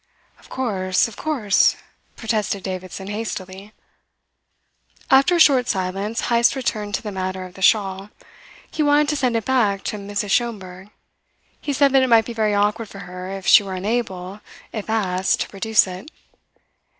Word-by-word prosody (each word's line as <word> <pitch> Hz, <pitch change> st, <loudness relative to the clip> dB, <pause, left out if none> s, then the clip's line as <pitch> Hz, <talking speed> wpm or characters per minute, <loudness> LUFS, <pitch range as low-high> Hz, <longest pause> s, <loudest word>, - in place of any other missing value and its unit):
"Of -, -, -20 dB
course, 190 Hz, -8 st, 0 dB
of 225 Hz, -, -11 dB
course," 245 Hz, -11 st, +2 dB, 0.4 s
protested 215 Hz, -4 st, -2 dB
Davidson 185 Hz, 0 st, -6 dB
hastily. 200 Hz, -1 st, -6 dB, 1.4 s
After 275 Hz, +7 st, +5 dB
a -, -, +1 dB
short 265 Hz, -6 st, +5 dB
silence 195 Hz, +4 st, -2 dB
Heyst 235 Hz, +2 st, +2 dB
returned 210 Hz, -5 st, -2 dB
to -, -, -5 dB
the 210 Hz, -, -5 dB
matter 185 Hz, -1 st, -4 dB
of 180 Hz, -, -12 dB
the 190 Hz, -, -13 dB
shawl. 195 Hz, -1 st, +2 dB, 0.6 s
He -, -, -2 dB
wanted 290 Hz, 0 st, +3 dB
to 300 Hz, -, 0 dB
send 255 Hz, -4 st, 0 dB
it 225 Hz, -2 st, -1 dB
back 215 Hz, -7 st, +1 dB
to 210 Hz, -, -3 dB
Mrs. 200 Hz, 0 st, -4 dB
Schomberg. 195 Hz, -5 st, -2 dB, 0.7 s
He 290 Hz, -, -3 dB
said 280 Hz, 0 st, +3 dB
that 270 Hz, 0 st, +5 dB
it 260 Hz, -, +1 dB
might 225 Hz, -2 st, +5 dB
be 235 Hz, -, -6 dB
very 215 Hz, -2 st, 0 dB
awkward 210 Hz, +2 st, 0 dB
for 200 Hz, -, -10 dB
her 180 Hz, +1 st, -8 dB
if 195 Hz, 0 st, -7 dB
she -, -, +7 dB
were 195 Hz, -2 st, -6 dB
unable, 195 Hz, -2 st, -3 dB, 0.3 s
if 215 Hz, -1 st, -6 dB
asked, 190 Hz, -4 st, 0 dB
to -, -, -3 dB
produce 215 Hz, +2 st, +2 dB
it. 185 Hz, +8 st, -9 dB
205 Hz, 165 wpm, -21 LUFS, 190-235 Hz, 1.4 s, she